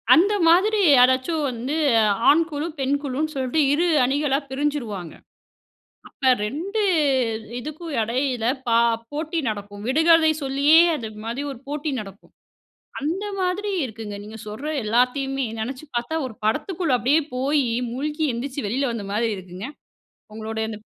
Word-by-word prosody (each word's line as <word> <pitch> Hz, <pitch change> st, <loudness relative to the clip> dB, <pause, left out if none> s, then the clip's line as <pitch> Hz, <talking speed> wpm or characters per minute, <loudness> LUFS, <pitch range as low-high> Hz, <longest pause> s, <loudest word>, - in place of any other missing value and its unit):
அந்த 390 Hz, +6 st, +5 dB
மாதிரி 400 Hz, +6 st, +4 dB, 0.2 s
யாராச்சும் 260 Hz, +5 st, +3 dB
வந்து 250 Hz, +4 st, -3 dB, 0.5 s
ஆண் 325 Hz, +3 st, +6 dB
குழு, 295 Hz, 0 st, -3 dB
பெண் 270 Hz, +1 st, +1 dB
குழுன்னு 295 Hz, +3 st, -2 dB
சொல்லிட்டு 260 Hz, +3 st, -1 dB
2 340 Hz, +4 st, +2 dB, 0.2 s
அணிகளா 275 Hz, +1 st, +1 dB
பிரிஞ்சிருவாங்க. 260 Hz, -, -3 dB, 1.0 s
அப்ப 265 Hz, -3 st, +1 dB
2 345 Hz, -, -3 dB, 0.8 s
இதுக்கும் 305 Hz, +4 st, -7 dB
இடையில 245 Hz, +1 st, -1 dB, 0.2 s
பா 230 Hz, 0 st, +4 dB, 0.3 s
போட்டி 315 Hz, +3 st, -3 dB
நடக்கும். 205 Hz, -1 st, -6 dB
விடுகதை 320 Hz, +3 st, +5 dB
சொல்லியே 280 Hz, +3 st, +4 dB, 0.2 s
அதுமாரி 225 Hz, +2 st, -5 dB
ஒரு 260 Hz, -, -11 dB
போட்டி 295 Hz, +1 st, -3 dB
நடக்கும். 200 Hz, -1 st, -12 dB, 0.7 s
அந்த 340 Hz, +8 st, -2 dB
மாதிரி 380 Hz, +3 st, -1 dB
இருக்குங்க. 220 Hz, -3 st, -7 dB
நீங்க 215 Hz, +2 st, -9 dB
சொல்ற 220 Hz, +8 st, -6 dB, 0.2 s
எல்லாத்தையுமே 255 Hz, +4 st, +1 dB, 0.2 s
நினைச்சு 255 Hz, +6 st, -5 dB
பார்த்தா, 240 Hz, +7 st, -2 dB
ஒரு 225 Hz, -, -11 dB
படத்துக்குள்ள 305 Hz, -, 0 dB
அப்பிடியே 280 Hz, +6 st, +3 dB
போய், 280 Hz, +3 st, +1 dB, 0.3 s
மூழ்கி 300 Hz, +5 st, -3 dB
எழுந்திரிச்சு 255 Hz, +1 st, -4 dB
வெளில 260 Hz, +5 st, 0 dB
வந்த 215 Hz, -3 st, -5 dB
மாதிரி 225 Hz, +2 st, 0 dB
இருக்குங்க. 185 Hz, +3 st, -8 dB, 0.7 s
உங்களுடைய 220 Hz, +1 st, -4 dB
அந்த 215 Hz, -, -6 dB
270 Hz, 130 wpm, -23 LUFS, 230-305 Hz, 1.0 s, ஆண்